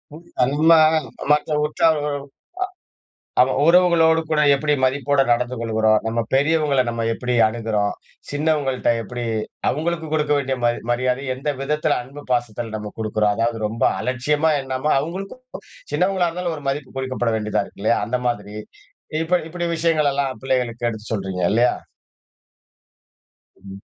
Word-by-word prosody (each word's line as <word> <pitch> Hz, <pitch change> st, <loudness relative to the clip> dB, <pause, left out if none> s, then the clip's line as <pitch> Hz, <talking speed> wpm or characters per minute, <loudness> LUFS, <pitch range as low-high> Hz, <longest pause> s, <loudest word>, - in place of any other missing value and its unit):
உ -, -, -8 dB, 0.2 s
நம்ம 145 Hz, +6 st, +3 dB, 0.6 s
மற்ற 150 Hz, +1 st, +2 dB
உறவு 150 Hz, 0 st, +2 dB, 1.3 s
அமா 130 Hz, -, +3 dB
உறவுகளோடு 165 Hz, -2 st, +5 dB
கூட 155 Hz, -1 st, +2 dB
எப்படி 150 Hz, +1 st, 0 dB
மதிப்போட 140 Hz, +1 st, +2 dB
நடந்து 125 Hz, +1 st, +1 dB
கொள்கிறோம். 110 Hz, -2 st, +2 dB
நம்ம 115 Hz, +1 st, -1 dB
பெரியவங்கள 145 Hz, -1 st, +3 dB
நம்ம 115 Hz, -1 st, -3 dB
எப்படி 125 Hz, +1 st, -3 dB
அணுகுறோம். 110 Hz, -2 st, -1 dB, 0.4 s
சின்னவங்கள்ட்ட 145 Hz, -3 st, 0 dB
எப்படி, 120 Hz, +3 st, -6 dB, 0.5 s
அவுங்களுக்கு 160 Hz, +3 st, -2 dB
குடுக்க 150 Hz, -1 st, 0 dB
வேண்டிய 135 Hz, -1 st, -1 dB
மரி 120 Hz, 0 st, +1 dB
மரியாதைய 130 Hz, +1 st, -1 dB
எந்த 145 Hz, +3 st, -3 dB
விதத்தில, 150 Hz, +2 st, 0 dB
அன்பு 140 Hz, +3 st, -11 dB
பாசத்தில 120 Hz, -2 st, -2 dB
நம்ம 105 Hz, -1 st, -6 dB
குடுக்குறோம்? 105 Hz, -1 st, +1 dB
அதாது 115 Hz, 0 st, 0 dB
ரொம்ப 115 Hz, +2 st, -3 dB, 0.2 s
அலட்சியமா 145 Hz, +5 st, +1 dB
எண்ணாம, 135 Hz, +3 st, -2 dB
அவுங்களுக்கும், 195 Hz, -, -6 dB, 0.5 s
சின்னவங்களா 180 Hz, +2 st, +2 dB
இருந்தாலும் 175 Hz, -1 st, -3 dB
ஒரு 145 Hz, -, -11 dB
மதிப்பு 135 Hz, -1 st, -5 dB
கொடுக்கப்பட 130 Hz, -3 st, -1 dB
வேண்டியதா 105 Hz, -1 st, -1 dB
இருக்கு, -, -, -15 dB
இல்லயா! 115 Hz, -, +3 dB
அந்த 125 Hz, +1 st, -1 dB
மாரி. 105 Hz, -2 st, -3 dB, 0.7 s
இப்ப 180 Hz, +2 st, +2 dB
இப்படி 175 Hz, +1 st, -3 dB
விஷயங்களெல்லாம் 145 Hz, -5 st, +1 dB
பிள்ளைகளுக்கு 120 Hz, -3 st, -1 dB
எடுத்து 110 Hz, 0 st, -8 dB
சொல்றீங்க, 95 Hz, -3 st, -3 dB
இல்லயா! 120 Hz, +2 st, +4 dB, 1.8 s
ம். 95 Hz, 0 st, -11 dB
130 Hz, 130 wpm, -21 LUFS, 115-150 Hz, 1.8 s, உறவுகளோடு